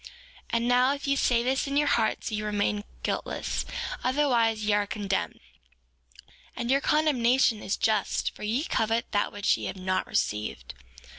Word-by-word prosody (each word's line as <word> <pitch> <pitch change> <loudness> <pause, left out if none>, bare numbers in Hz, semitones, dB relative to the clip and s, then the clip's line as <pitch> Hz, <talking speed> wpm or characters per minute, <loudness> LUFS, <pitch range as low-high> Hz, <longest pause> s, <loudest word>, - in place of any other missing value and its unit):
4:25 - - -12 0.4
And 235 0 +1
now, 250 +2 +4
if 280 - -8
ye 275 0 +2
say 240 -3 +2
this 265 +3 0
in 280 +1 -1
your 295 0 +3
hearts 225 -2 +1
ye 215 0 -2
remain 210 0 -1 0.2
guiltless, - - -2 0.4
otherwise 240 -5 +2
ye 210 - +2
are 205 0 +1
condemned; 200 -2 -2 1.2
and 240 +1 -2
your 275 +1 +3
condemnation 260 -7 +2
is 195 - -2
just 220 -1 0
for - - -15
ye 225 +7 0
covet 225 -6 0
that 205 -1 0
which 205 0 +1
ye - - -6
have - - -4
not 185 0 -1
received. 105 - -2
230 Hz, 165 wpm, -27 LUFS, 210-260 Hz, 1.2 s, now